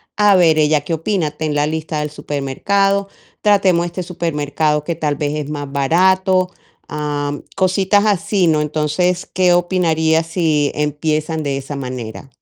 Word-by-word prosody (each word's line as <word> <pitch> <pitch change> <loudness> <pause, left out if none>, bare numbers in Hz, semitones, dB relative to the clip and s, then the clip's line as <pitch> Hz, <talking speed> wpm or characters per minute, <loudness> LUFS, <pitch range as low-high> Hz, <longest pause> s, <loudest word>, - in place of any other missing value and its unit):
A 205 -1 +5
ver 165 -4 +4
ella 150 -1 +3
qué 150 - -4
opina. 165 -1 -1
Ten 150 0 -3
la 145 0 +2
lista 155 0 -3
del 150 - -4
supermercado, 195 +8 0 0.3
tratemos 190 -4 +3
este 175 +1 -5
supermercado 150 -3 -1
que 170 - -2
tal 150 -3 -1
vez 145 0 -2
es 145 - -9
más 145 -2 -5
barato. 185 +6 +2 0.4
Ah, 145 -1 -2 0.2
cositas 190 +2 +2
así, 200 -2 +1
¿no? 155 -2 +3
Entonces, 155 +4 -1
¿qué 180 -1 +3
opinarías 165 -3 +1
si 160 -4 +1
empiezan 155 +1 -1
de 140 -2 -2
esa 135 +1 -6
manera? 125 -3 -6
160 Hz, 150 wpm, -18 LUFS, 150-180 Hz, 0.4 s, A